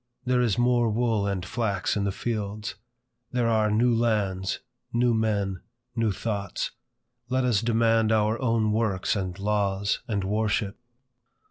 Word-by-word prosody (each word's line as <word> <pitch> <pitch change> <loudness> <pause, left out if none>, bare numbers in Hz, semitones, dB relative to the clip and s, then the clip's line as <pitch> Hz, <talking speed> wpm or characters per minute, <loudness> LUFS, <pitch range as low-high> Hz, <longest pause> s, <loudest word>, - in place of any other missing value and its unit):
There 125 -1 +2
is 115 -5 +1
more 120 -1 +3
wool 110 -2 +1
and 95 -3 -2
flax 100 -2 -1
in 100 -1 0
the 100 - 0
fields. 105 0 -3 0.6
There 125 -2 +1
are 110 -2 +3
new 115 +3 +3
lands, 105 -5 0 0.3
new 120 0 +2
men, 100 -4 0 0.3
new 115 -3 +1
thoughts. 100 0 -3 0.6
Let 130 0 +1
us 115 -5 +2
demand 115 -1 +3
our 110 +2 +2
own 115 -3 +2
works 105 -4 0
and 95 -3 -3
laws 100 -1 0
and 100 -4 -1
worship. 105 0 0
110 Hz, 140 wpm, -26 LUFS, 100-115 Hz, 0.6 s, more